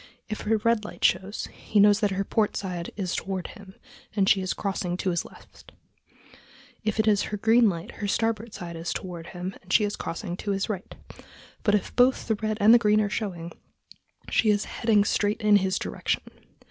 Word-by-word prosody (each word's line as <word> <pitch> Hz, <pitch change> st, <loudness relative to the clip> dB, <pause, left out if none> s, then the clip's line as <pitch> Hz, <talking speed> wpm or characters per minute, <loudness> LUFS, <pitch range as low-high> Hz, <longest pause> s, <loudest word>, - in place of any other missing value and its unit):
If 215 Hz, -, -4 dB
her 220 Hz, +1 st, +1 dB
red 230 Hz, 0 st, +1 dB
light 210 Hz, -, -3 dB
shows, 190 Hz, +3 st, +1 dB
he 210 Hz, -, -1 dB
knows 205 Hz, 0 st, +6 dB
that 210 Hz, -2 st, +2 dB
her 195 Hz, 0 st, -1 dB
port 210 Hz, +1 st, 0 dB
side 180 Hz, -3 st, -4 dB
is 190 Hz, -3 st, -2 dB
toward 190 Hz, -3 st, -3 dB
him 200 Hz, -4 st, -13 dB, 0.4 s
and 195 Hz, -3 st, +2 dB
she 195 Hz, -, +4 dB
is 185 Hz, -, -2 dB
crossing 185 Hz, -3 st, -2 dB
to 185 Hz, -, 0 dB
his 170 Hz, -, -1 dB
left; -, -, -16 dB, 1.1 s
if 215 Hz, 0 st, -1 dB
it 220 Hz, -, +2 dB
is 205 Hz, -2 st, +4 dB
her 210 Hz, -, -3 dB
green 225 Hz, +2 st, +5 dB
light, 170 Hz, -3 st, -5 dB
her 205 Hz, -, -3 dB
starboard 225 Hz, +2 st, -1 dB
side 170 Hz, -1 st, -7 dB
is 165 Hz, +1 st, -3 dB
toward 175 Hz, -3 st, -6 dB
him 180 Hz, +1 st, -5 dB
and 185 Hz, -, -11 dB
she 215 Hz, -, +5 dB
is 205 Hz, 0 st, -1 dB
crossing 175 Hz, +1 st, -5 dB
to 200 Hz, 0 st, -2 dB
his 195 Hz, +3 st, -2 dB
right; 195 Hz, -3 st, -5 dB, 0.7 s
but 205 Hz, -1 st, +3 dB
if 205 Hz, -, -2 dB
both 255 Hz, +1 st, +3 dB
the 220 Hz, -, +2 dB
red 215 Hz, -1 st, -1 dB
and 225 Hz, +4 st, +7 dB
green 210 Hz, -1 st, +3 dB
are 205 Hz, -1 st, 0 dB
showing, 175 Hz, -7 st, -4 dB, 0.8 s
she 220 Hz, -, +2 dB
is 205 Hz, 0 st, +2 dB
heading 220 Hz, -3 st, +2 dB
straight 205 Hz, 0 st, 0 dB
in 210 Hz, -1 st, +6 dB
his 190 Hz, -1 st, 0 dB
direction.... -, -, -2 dB
205 Hz, 200 wpm, -26 LUFS, 185-215 Hz, 1.1 s, and